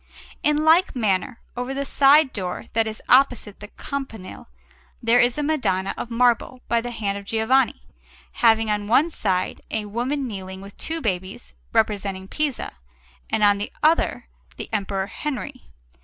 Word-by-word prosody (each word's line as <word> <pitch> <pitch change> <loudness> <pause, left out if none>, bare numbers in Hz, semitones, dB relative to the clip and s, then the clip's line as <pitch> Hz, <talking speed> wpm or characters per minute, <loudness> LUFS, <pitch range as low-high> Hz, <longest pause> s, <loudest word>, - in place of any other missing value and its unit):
In 300 +1 +2
like 330 +2 +4
manner, 215 -1 0 0.2
over 250 +2 -4
the 280 0 -2
side 280 +1 +5
door 180 -3 -4
that 225 0 +2
is 220 0 -6
opposite 250 -6 +3
the 210 - -9
campanile, 225 - -7 0.5
there 235 +1 +3
is 240 +2 +3
a 295 - -1
Madonna 225 -11 0
of 240 - -6
marble 245 +1 +1
by 235 0 +2
the 245 - -5
hand 205 -4 -2
of 200 - -13
Giovanni, 225 +5 +1 0.5
having 225 -1 +3
on 205 -1 -2
one 285 +9 +3
side 185 -9 -1
a 215 -1 -2
woman 250 +6 -2
kneeling 190 -3 -7
with 200 +1 -12
two 325 0 -3
babies, 190 - -4 0.2
representing 200 -3 0
Pisa, 295 +2 -2 0.6
and 210 - 0
on 205 -1 +5
the 205 - -4
other 320 +2 +2 0.3
the - - -8
Emperor 195 -2 -1
Henry. 275 +3 -6
230 Hz, 155 wpm, -23 LUFS, 200-270 Hz, 0.6 s, side